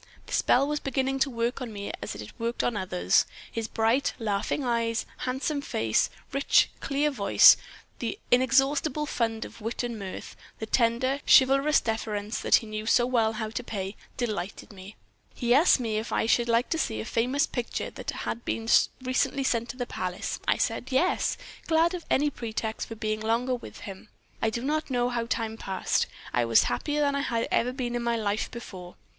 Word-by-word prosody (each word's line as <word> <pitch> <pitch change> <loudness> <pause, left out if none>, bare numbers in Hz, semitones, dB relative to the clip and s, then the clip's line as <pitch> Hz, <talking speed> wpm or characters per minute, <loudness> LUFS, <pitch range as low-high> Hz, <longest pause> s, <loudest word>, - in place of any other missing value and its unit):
The - - -9
spell 270 +3 +3
was 300 0 -1
beginning 270 0 -1
to 275 - +2
work 235 +1 -2
on 245 -3 -5
me 200 -1 -5
as 105 - -5
it 105 0 -9
worked 230 +1 -1
on 240 - 0
others. 95 - +2 0.2
His 225 -1 -3
bright, 225 +5 +1
laughing 215 +4 -1
eyes, 230 -1 0 0.2
handsome 275 +3 -1
face, 110 - +1 0.2
rich, 275 +1 +3
clear 285 +2 0
voice, 205 -7 +7 0.4
the 230 -3 -3
inexhaustible 270 +4 +3
fund 225 -5 -1
of - - -12
wit 225 +3 -3
and 235 -2 -4
mirth, 190 -2 -7 0.2
the 220 - -4
tender, 240 +4 +1
chivalrous 275 +3 +6
deference 215 -1 -3
that - - +4
he - - +2
knew 215 0 -5
so 240 - +4
well 230 -3 +2
how 215 0 -4
to 245 - -4
pay, 200 -3 -5 0.2
delighted 210 -4 -4
me. 195 +2 -11 0.4
He 240 -1 +2
asked 290 +2 +5
me 220 -3 -1
if 220 - -6
I - - +1
should 235 +1 +2
like 230 +2 +2
to 325 - +1
see 110 - -1
a 110 - -4
famous 255 - +1
picture 245 -2 -4
that - - -7
had 235 - -4
been 225 0 -3 0.4
recently 255 +2 0
sent 235 -3 0
to - - -6
the 245 - -2
palace. 180 -6 -4
I - - +3
said 260 - -1
'Yes,' 345 +8 +1 0.3
glad 330 +2 +3
of 355 -2 -6
any 290 +2 +2
pretext 225 -2 -4
for 225 - -7
being 215 0 -2
longer 230 +4 0
with 245 - -7
him. 195 +1 -9 0.3
I 225 - +2
do 235 +2 -4
not 305 +3 -1
know 245 -1 +1
how 235 -1 -2
time 225 -2 -2
passed. 190 -3 -1 0.3
I 120 - +2
was 115 -1 +5
happier 295 - -1
than 285 -1 +2
I 280 - 0
had 230 -4 -1
ever 245 +2 +2
been 250 -2 -3
in 240 - -1
my 235 0 0
life 215 -1 -1
before. 185 -7 -9
235 Hz, 195 wpm, -27 LUFS, 220-265 Hz, 0.4 s, voice